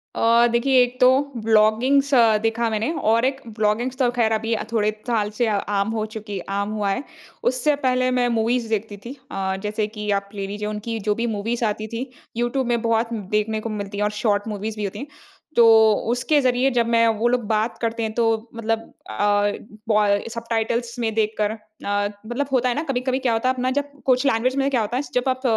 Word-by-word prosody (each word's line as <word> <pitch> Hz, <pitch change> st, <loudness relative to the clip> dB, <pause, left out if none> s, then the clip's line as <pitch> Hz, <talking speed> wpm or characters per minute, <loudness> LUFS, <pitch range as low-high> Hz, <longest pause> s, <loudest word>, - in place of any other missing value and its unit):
अ, 235 Hz, +1 st, +4 dB
देखिए 255 Hz, +2 st, +3 dB
एक 245 Hz, +1 st, -1 dB
तो 250 Hz, -, +8 dB, 0.4 s
ब्लॉगिंग्स 225 Hz, +6 st, +3 dB, 0.3 s
देखा 225 Hz, +1 st, 0 dB
मैंने 220 Hz, +6 st, -1 dB, 0.2 s
और 230 Hz, +2 st, +3 dB
एक 265 Hz, +1 st, -1 dB, 0.2 s
ब्लॉगिंग्स 225 Hz, +4 st, 0 dB
तो 250 Hz, -2 st, +2 dB
ख़ैर 235 Hz, -2 st, +1 dB
अभी 225 Hz, +1 st, 0 dB, 0.2 s
थोड़े 215 Hz, -2 st, +1 dB, 0.2 s
साल 220 Hz, -4 st, +1 dB
से 235 Hz, +2 st, 0 dB
अ, 215 Hz, -, +1 dB
आम 200 Hz, 0 st, 0 dB
हो 220 Hz, -1 st, -1 dB
चुकी 210 Hz, -2 st, -5 dB
है 185 Hz, -, -6 dB, 0.2 s
आम 200 Hz, +1 st, -2 dB
हुआ 205 Hz, -1 st, 0 dB
है। 195 Hz, +7 st, -1 dB, 0.4 s
उससे 260 Hz, +4 st, +2 dB
पहले 255 Hz, 0 st, +2 dB
मैं 250 Hz, -1 st, +2 dB
मूवीज़ 230 Hz, +1 st, 0 dB
देखती 215 Hz, -1 st, -2 dB
थी। 245 Hz, -, -6 dB, 0.2 s
अ, 190 Hz, -1 st, -2 dB
जैसे 210 Hz, 0 st, -1 dB
कि 210 Hz, -1 st, -6 dB
आप 200 Hz, 0 st, -21 dB
ले 195 Hz, -1 st, -3 dB
लीजिए 210 Hz, +1 st, -4 dB
उनकी 215 Hz, +2 st, -4 dB
जो 210 Hz, 0 st, 0 dB
भी 235 Hz, +2 st, -1 dB
मूवीज़ 230 Hz, +3 st, -1 dB
आती 215 Hz, 0 st, -2 dB
थी 235 Hz, +4 st, -5 dB, 0.3 s
यूट्यूब 240 Hz, +2 st, 0 dB
में 240 Hz, -1 st, +1 dB
बहुत 230 Hz, 0 st, 0 dB, 0.2 s
देखने 215 Hz, +1 st, -1 dB
को 230 Hz, -, -4 dB
मिलती 205 Hz, -1 st, -5 dB
है 205 Hz, -, 0 dB
और 210 Hz, -, +1 dB
शॉर्ट 205 Hz, -1 st, +1 dB
मूवीज़ 215 Hz, 0 st, -4 dB
भी 210 Hz, -, -3 dB
होती 200 Hz, -, -4 dB
हैं। 280 Hz, -, -6 dB, 0.5 s
तो 235 Hz, -, +6 dB, 0.5 s
उसके 260 Hz, +5 st, +2 dB
ज़रिए 255 Hz, 0 st, +2 dB
जब 240 Hz, -2 st, +2 dB
मैं 230 Hz, 0 st, +4 dB
वो 235 Hz, -, +2 dB
लोग 245 Hz, 0 st, +1 dB
बात 220 Hz, +2 st, 0 dB
करते 230 Hz, 0 st, -1 dB
हैं 220 Hz, -, -2 dB
तो 235 Hz, +1 st, +1 dB, 0.3 s
मतलब 225 Hz, 0 st, -1 dB, 0.3 s
अ, 205 Hz, -, +2 dB, 0.4 s
ब 205 Hz, -2 st, +3 dB
सबटाइटल्स 230 Hz, +1 st, -2 dB
में 225 Hz, -2 st, -1 dB
देखकर 215 Hz, -1 st, 0 dB
अ, 220 Hz, -, -7 dB, 0.7 s
मतलब 245 Hz, +5 st, -2 dB
होता 255 Hz, -1 st, +2 dB
है 240 Hz, -, -1 dB
ना, 305 Hz, -, -1 dB
कभी-कभी 260 Hz, -3 st, -1 dB
क्या 255 Hz, -3 st, +1 dB
होता 225 Hz, +3 st, +1 dB
है -, -, +3 dB
अपना 255 Hz, 0 st, -1 dB
जब 285 Hz, +1 st, -2 dB
कुछ 255 Hz, +1 st, +3 dB
लैंग्वेज़ 255 Hz, +1 st, +1 dB
में 275 Hz, 0 st, +2 dB
क्या 255 Hz, -4 st, +1 dB
होता 220 Hz, +3 st, -2 dB
है 270 Hz, -, -1 dB
जब 250 Hz, +1 st, +1 dB
आप 260 Hz, 0 st, -1 dB
230 Hz, 215 wpm, -22 LUFS, 215-250 Hz, 0.7 s, तो